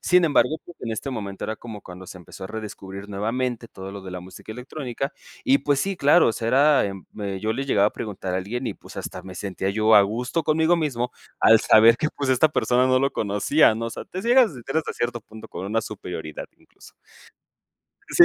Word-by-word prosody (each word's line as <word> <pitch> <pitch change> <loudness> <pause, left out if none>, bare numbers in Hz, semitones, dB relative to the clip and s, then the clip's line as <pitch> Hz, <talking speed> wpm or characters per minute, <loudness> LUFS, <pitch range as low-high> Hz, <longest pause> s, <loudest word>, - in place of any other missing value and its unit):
Sin 180 -1 +4
embargo, 155 +1 +3
pues, 175 - -14
en 115 - -4
este 135 +5 -4
momento 100 -5 -5
era 110 - -3
como 110 -4 -9
cuando 90 0 -11
se 95 - -9
empezó 90 +2 -11
a - - -4
redescubrir 100 -2 -7
nuevamente 115 +3 -2
todo 95 0 -9
lo 100 - -7
de 95 -1 -9
la 90 - -6
música 95 +4 -11
electrónica, 130 +2 -5 0.3
y 275 0 +5
pues 145 - +1
sí, 195 +6 -1
claro, 145 0 +5
o - - +1
sea 115 +1 -3
era 140 -1 +4
eh, 100 0 -6
yo 110 +3 -1
le 135 +4 -3
llegaba 105 -5 +4
a - - -21
preguntar 100 -4 -5
a 90 - 0
alguien, 120 +7 -4
y - - -1
pues, - - -15
hasta - - -6
me 95 -1 -10
sentía 95 0 -3
yo 110 +2 +3
a - - +9
gusto 125 +10 -1
conmigo 160 +3 +3
mismo 125 -7 -1 0.3
al 110 0 +6
saber 115 +2 +6
que, 155 - +1
pues, 140 -2 -1
esta 130 +5 +4
persona 125 -3 +2
no 130 0 +4
lo 135 +1 +1
conocía, 110 +5 +3
¿no? 115 +1 -4
O - - -4
sea, - - -7
te 185 - -6
ciegas 240 -3 +5 0.2
hasta 160 - 0
cierto 120 0 -2
punto 110 +1 -12
por 95 - -6
una 115 +2 0
superioridad 90 -8 -7
incluso. - - -19 1.2
Sí - - +8
115 Hz, 220 wpm, -24 LUFS, 100-140 Hz, 1.2 s, a